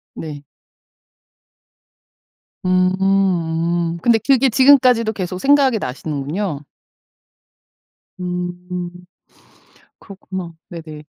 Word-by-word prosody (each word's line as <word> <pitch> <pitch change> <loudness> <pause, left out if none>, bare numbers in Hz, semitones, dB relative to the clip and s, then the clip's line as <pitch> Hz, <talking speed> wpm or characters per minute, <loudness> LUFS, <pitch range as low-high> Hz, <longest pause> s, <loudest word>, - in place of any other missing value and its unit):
네. 150 -3 -7 2.2
음 185 0 +3
음. 170 -3 +1
근데 235 +3 +4
그게 270 -1 +4
지금까지도 255 -3 +5
계속 185 -2 -4
생각이 275 -1 +4
나시는군요. 150 +3 -4 1.5
음. 180 0 -4 1.1
그렇구나. 190 -3 -8
네네. 155 -3 -9
180 Hz, 155 characters per minute, -19 LUFS, 165-210 Hz, 2.2 s, 지금까지도